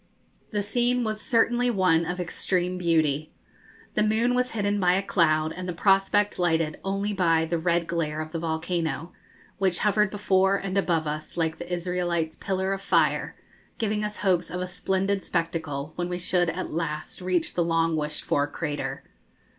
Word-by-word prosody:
The 205 -2 -1
scene 245 +3 +1
was 215 -1 -2
certainly 240 +1 +2
one 180 -6 +3
of 180 +1 -3
extreme 180 +1 -1
beauty. 155 -3 +1 0.6
The - - +1
moon 220 +3 +2
was 250 0 0
hidden 205 -1 0
by 180 -2 +4
a 195 +2 +1
cloud, 155 -4 +2
and 185 +1 -5
the - - -2
prospect 195 +2 +3
lighted 165 -3 +1
only 195 +2 -1
by 165 -4 +3
the 170 +1 -1
red 170 0 +1
glare 155 -2 -2
of 155 0 -5
the 165 - -3
volcano, 165 +1 -2 0.5
which 190 -3 +2
hovered 210 -1 +3
before 195 -1 +2
and 195 -1 -3
above 170 -5 +1
us 155 +2 -5
like 160 -1 0
the 175 +1 -7
Israelites' 175 -2 -1
pillar 190 0 -1
of 195 - -4
fire, - - +1 0.4
giving 215 -1 -1
us 210 0 -3
hopes 180 -4 +1
of 180 +2 -4
a 180 - -1
splendid 190 +2 -1
spectacle 160 -4 -2
when 175 0 -2
we 180 - -2
should 175 -1 +1
at 180 +1 -4
last 155 +1 -3
reach 180 -2 0
the 175 - +1
long 165 -1 +1
wished 150 0 -3
for 145 0 +1
crater. 150 0 -4
180 Hz, 175 wpm, -26 LUFS, 165-195 Hz, 0.6 s, by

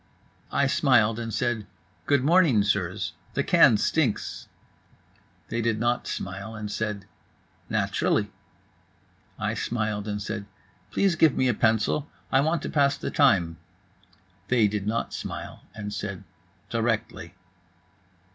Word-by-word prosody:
I 140 - +2
smiled 130 -5 +3
and 115 -1 -4
said: 110 -2 -1 0.4
"Good 140 -2 +3
morning, 155 - +4
sirs. 95 -3 -1 0.2
The - - +1
can 110 - +6
stinks." 125 +1 -1 1.0
They 115 - -1
did 115 -1 0
not 120 +1 0
smile 100 +4 -5
and 105 -1 -5
said: 105 -2 -3 0.6
"Naturally." - - 0 1.1
I - - -1
smiled 110 -3 -2
and 105 -1 -2
said: 105 0 -5 0.4
"Please 195 -3 +2
give 155 -3 +4
me 130 - +3
a 125 - +3
pencil. 110 +7 +1 0.2
I 135 - +4
want 160 +3 0
to - - -3
pass 140 -2 +2
the - - -4
time." 90 - +3 0.9
They 120 -4 +4
did 100 0 -3
not 115 +2 -1
smile - - -6
and 105 -1 -5
said: 100 -2 -5 0.5
"Directly." 115 -1 -2
110 Hz, 130 wpm, -26 LUFS, 105-130 Hz, 1.1 s, can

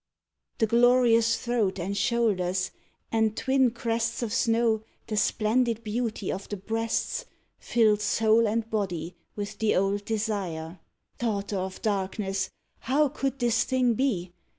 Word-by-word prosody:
The 225 - +3
glorious 235 0 +4
throat 230 -6 0
and 190 +4 -2
shoulders 190 -6 +1 0.4
and, 220 -1 +1
twin 265 -1 +3
crests 230 0 -2
Of 225 -2 -3
snow, 230 -3 +2 0.2
the 215 - -4
splendid 230 +2 +1
beauty 220 -2 -2
of 195 - -6
the 205 - -3
breasts, 225 - -2 0.3
Filled 215 -3 +2
soul 220 +1 +3
and 220 +1 -1
body 180 -6 -3 0.2
with 205 -1 -5
the 220 -1 +2
old 195 +2 +1
desire. 195 -7 -3 0.4
Daughter 205 -3 -1
of 190 0 -5
darkness! 195 -1 -1 0.3
how 280 +4 +2
could 270 0 -2
this 240 -2 +2
thing 255 -2 +2
be? 205 -8 -1
220 Hz, 130 wpm, -27 LUFS, 200-235 Hz, 0.4 s, glorious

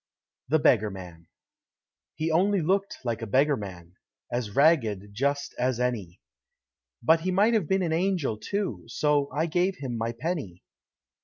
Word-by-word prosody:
The 160 - +4
Beggar 110 -8 +3
Man 90 -4 -10 0.9
He 160 +1 -1
only 195 +5 +3
looked 195 +4 0
like 115 -2 -2
a 115 - -4
Beggar 140 +6 +3
man, 90 -5 -9 0.3
As 115 -4 -3
ragged, 115 - +3
just, 140 +5 -1
as 125 -1 0
any. 110 -9 -2 0.8
But 160 +6 +5
he 180 +3 -2
might 205 +5 +3
have 210 -8 +1
been 190 +2 +1
an 165 -2 0
Angel, 170 - 0
too. 190 - -3
So 145 +3 +1
I 150 +4 0
gave 175 +3 +1
him 130 -7 -5
my 115 +1 -1
penny. 130 - -4
140 Hz, 155 wpm, -27 LUFS, 110-170 Hz, 0.9 s, But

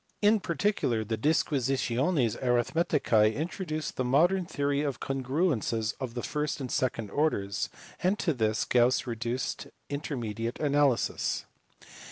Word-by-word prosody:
In 210 +1 +4
particular 170 - 0
the 110 +1 -2
Disquisitiones 135 - +1
Aritkmeticae 120 -3 +2
introduced 155 -1 -3
the 130 - +1
modern 170 +8 +3
theory 140 -2 0
of 140 -3 -2
congruences 130 - 0
of 125 -3 -5
the 120 - -3
first 150 0 -2
and 130 -3 -5
second 115 -5 -1
orders, 110 -9 0 0.3
and 185 +5 +2
to 165 - 0
this 110 -4 0
Gauss 125 +1 +3
reduced 120 +1 -3 0.2
indeterminate 120 -6 -3
analysis. 145 -4 +1
135 Hz, 120 wpm, -29 LUFS, 115-155 Hz, 0.3 s, In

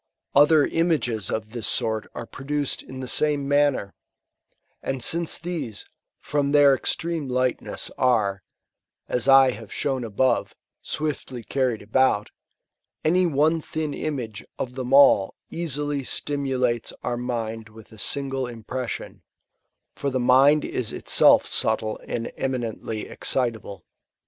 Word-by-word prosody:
Other 150 +1 +6
imoffts 150 - 0
of 110 -1 -3
this 120 -2 -2
sort 110 -3 0
are - - -5
produced 140 +3 -3
in 130 0 -9
the 130 - -5
same 145 +1 +1
manner; 145 -8 +2 0.9
and 135 -3 -3
since 170 +3 0
these, 155 -11 -5 0.3
from 145 -1 -1
their 145 -2 +7
extreme 160 +1 -2
lightness, 125 0 -1
are, 105 -6 +2 0.7
as 125 +1 -1
I 135 -1 +7
have - - -10
shown 135 -3 -1
above, 120 +3 0 0.3
swiftly 140 -5 -4
carried 125 -2 -1
aboot, 110 -1 +2 0.7
any 180 +3 +3
one 160 +2 +2
thin 155 -1 -4
image 120 -10 -4 0.2
(^ 130 - -2
them 130 -1 -5
all 135 -8 +6 0.2
easily 145 -4 -2
stimulates 130 -4 -1
our 120 - -1
mind 115 -2 -4
with 110 0 -15
a 110 - -13
single' 135 +2 -1
impression; 120 +1 -6 0.7
for 140 - -2
the 130 -1 -1
mind 135 +4 +5
is 120 -4 -2
itself - - +4
subtle 110 -1 +1
and 115 0 -3
eminently 115 -4 -3
excitable. 115 -6 -3
130 Hz, 125 wpm, -24 LUFS, 115-145 Hz, 0.9 s, their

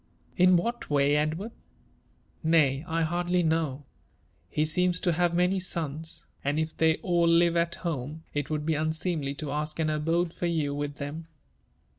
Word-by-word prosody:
" - - -34
In 185 -1 +6
what 235 +7 -2
way, 145 0 +3
Edward 155 +9 -1
r - - -27 0.3
> - - -37
" - - -37
Nay, 140 -3 +4
I 165 +1 0
hardly 175 +2 +1
know. 160 -4 0 0.7
He 155 - +1
seems 180 +3 +1
to 180 - +2
have 175 +1 +1
many 180 +2 +2
sons; 160 -3 -4 0.2
and 145 +2 0
if 160 0 -2
they 160 0 +3
all 175 -2 +2
live 170 0 +4
at 170 0 +1
home, 155 -1 -4
it 145 -1 -2
would 150 -1 -2
be 160 - +1
unseemly 155 -2 -1
to 150 -1 -4
ask 150 +1 -2
an 155 -1 +1
abode 165 +3 0
for 175 - -2
you 155 -4 0
with 145 0 -3
them." 150 +3 -6
160 Hz, 185 wpm, -28 LUFS, 150-175 Hz, 0.7 s, In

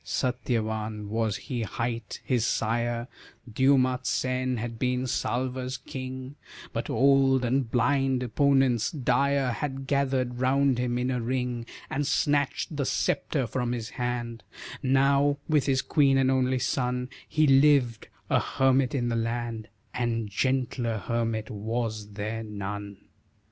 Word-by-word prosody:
Satyavan 110 -4 -2
was 110 -1 0
he 125 -3 -4
hight, 115 0 -4
his 125 -4 +1
sire 115 +1 0 0.4
Dyoumatsen 130 0 +1
had 115 0 -5
been 125 0 0
Salva's 130 +2 -2
king, 130 +1 -7 0.4
But - - -3
old 135 -1 +4
and 125 0 +1
blind, 135 +1 +2
opponents 135 -2 +2
dire 140 -1 +1
Had 135 +1 -4
gathered 130 -3 0
round 130 0 +2
him 120 -1 0
in 125 +1 0
a 125 -2 -1
ring 125 -1 -2 0.2
And 145 +1 -2
snatched 145 +1 0
the 140 -2 -1
sceptre 135 -5 0
from 120 +1 -2
his 115 -2 -4
hand; 120 -2 -3 0.4
Now, 140 +1 +3
with 150 -3 +2
his 135 -1 +2
queen 140 -3 +3
and 135 0 +3
only 130 0 +2
son 125 -1 -1 0.2
He 155 0 +3
lived 135 -4 +4 0.2
a - - +3
hermit 135 0 +2
in 120 -3 0
the 115 - 0
land, 115 -1 -2 0.3
And 115 -3 -1
gentler 125 0 0
hermit 115 +1 -2
was 110 0 -3
there 110 +2 -3
none. 100 -1 -6
125 Hz, 130 wpm, -27 LUFS, 115-135 Hz, 0.4 s, old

